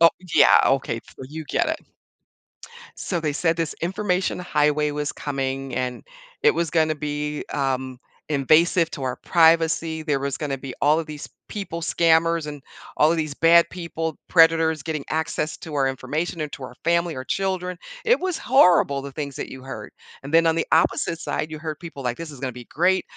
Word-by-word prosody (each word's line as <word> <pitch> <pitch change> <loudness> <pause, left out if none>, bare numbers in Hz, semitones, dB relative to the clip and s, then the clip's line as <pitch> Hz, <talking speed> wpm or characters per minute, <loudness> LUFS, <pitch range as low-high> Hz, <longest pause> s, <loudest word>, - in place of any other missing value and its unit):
oh, 165 0 +8 0.2
yeah, - - +7
okay, 130 -4 0
so 130 - -11
you 160 +1 -7
get - - 0
it. - - -1 1.2
So 175 - -2
they 155 -3 -1
said 165 +1 +1
this 165 -2 -1
information 185 +1 -1
highway 150 -3 +1
was 145 0 -2
coming, 135 -1 -3
and 125 -1 -3 0.4
it 450 +1 +6
was 170 -1 0
gonna 155 0 +2
be, 150 0 -3
um, 130 -2 -2 0.3
invasive 160 +4 +3
to 140 - -6
our 130 -1 -2
privacy, 165 -1 +2
there 145 -3 0
was 140 0 -3
gonna 145 -3 -2
be 135 0 -7
all 150 +3 +4
of 160 - -5
these 150 -1 -7 0.2
people, 175 -5 -5
scammers, 165 -1 +2
and 145 -2 -7 0.3
all 150 - +4
of 170 - 0
these 155 -2 -2
bad 170 +2 +5
people 165 -3 -4
predators 165 -2 +4
getting 155 -3 -3
access 160 0 -2
to 160 -3 -9
our 135 -2 +2
information 150 +6 -3
and 150 -1 -4
to 145 - -8
our 125 -1 -8
family, 170 -1 +1
our 130 - -5
children 185 +1 -2 0.3
it 485 +2 +4
was 365 -3 -2
horrible 175 - +4
the 140 0 -7
things 140 -2 -5
that - - -5
you 130 -1 -10
heard, 120 -6 -8 0.3
and 140 +2 -8
then 165 0 +5
on 165 0 +3
the 165 - -1
opposite 165 +1 +2
side, 155 - -3
you 155 - -6
heard 155 -1 -6
people 160 -5 -9
like, 125 -1 -2
"This 165 -1 -7
is 140 -4 -11
gonna 130 -2 -3
be 120 0 -10
great, 185 +4 +1
155 Hz, 195 wpm, -23 LUFS, 140-165 Hz, 1.2 s, oh